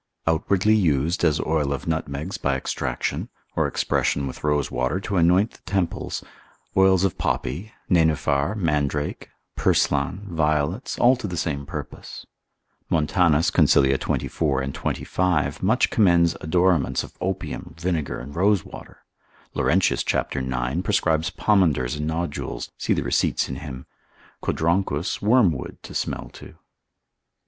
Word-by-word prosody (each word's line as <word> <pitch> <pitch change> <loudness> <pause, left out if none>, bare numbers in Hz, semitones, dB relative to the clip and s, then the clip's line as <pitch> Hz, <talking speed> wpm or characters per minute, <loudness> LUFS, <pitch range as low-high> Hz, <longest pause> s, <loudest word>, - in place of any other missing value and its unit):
Outwardly 95 +6 +2
used, 85 -4 +1
as 80 -2 +3
oil 75 -3 0
of 70 - -3
nutmegs 80 +2 -3
by 70 -1 0
extraction, 65 - -3 0.3
or - - +2
expression 70 - 0
with 65 - -7
rosewater 75 +1 0
to 100 -1 -2
anoint 90 +6 +4
the - - -19
temples, 95 -3 -1 0.5
oils 95 -1 +5
of 95 -4 0
poppy, 105 +5 -2 0.2
nenuphar, 80 -1 +2
mandrake, 75 -5 -1 0.3
purslan, 90 +8 +1
violets, 80 - 0
all 125 +2 +5
to 120 - -5
the 90 -2 -5
same 70 -4 -2
purpose. - - -8 0.6
Montan. 85 +1 +3 0.2
consil. 70 -1 +4
24 70 -4 -1
& 70 - -4
25. 90 -5 -1
much - - +2
commends 85 -5 +4
odoraments 85 -2 +2
of - - -12
opium, 95 +1 -4
vinegar, 85 -4 -2
and 70 +4 -9
rosewater. 95 0 -1 0.5
Laurentius - - +2
cap. - - -1
9. 65 +4 -2
prescribes 85 -5 +1
pomanders 80 - +2
and 75 +1 -3
nodules; 80 -1 -3
see - - 0
the - - -1
receipts - - +1
in 65 - -5
him; 65 -3 -8 0.6
Codronchus 85 -1 0
wormwood 105 - +2
to - - -9
smell - - -3
to. - - -13
80 Hz, 125 wpm, -24 LUFS, 70-95 Hz, 0.6 s, oils